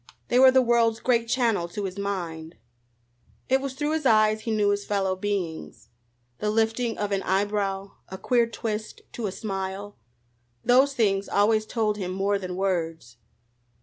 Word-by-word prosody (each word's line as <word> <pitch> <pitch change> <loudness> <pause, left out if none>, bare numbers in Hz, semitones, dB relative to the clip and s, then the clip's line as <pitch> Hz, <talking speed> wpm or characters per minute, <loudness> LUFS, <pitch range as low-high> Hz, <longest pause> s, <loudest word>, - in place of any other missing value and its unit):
They 245 - +3
were 260 0 +9
the 260 0 +4
world's 230 -2 +2
great 235 -2 +1
channel 230 -8 +1
to 200 +4 -5
his 190 0 -5
mind. 170 -5 -4 0.9
It 265 +1 +3
was 270 -1 -5
through 295 +2 -1
his 315 0 -1
eyes 215 -1 +4
he 225 - -5
knew 210 -2 +2
his 205 0 0
fellow 195 -2 0
beings. 185 -5 -4 0.5
The 210 - -1
lifting 225 +2 0
of 205 -1 -2
an 195 -1 0
eyebrow, 195 0 -1 0.2
a 190 - -7
queer 235 +3 +2
twist 220 -2 -5
to 230 -3 -4
a - - -3
smile 195 - -5 0.7
those 265 +3 +4
things 200 -5 +1
always 215 +1 +2
told 215 -3 0
him 185 -3 -4
more 195 +2 0
than 180 -2 -5
words. 165 -10 -2
205 Hz, 165 wpm, -25 LUFS, 195-230 Hz, 0.9 s, were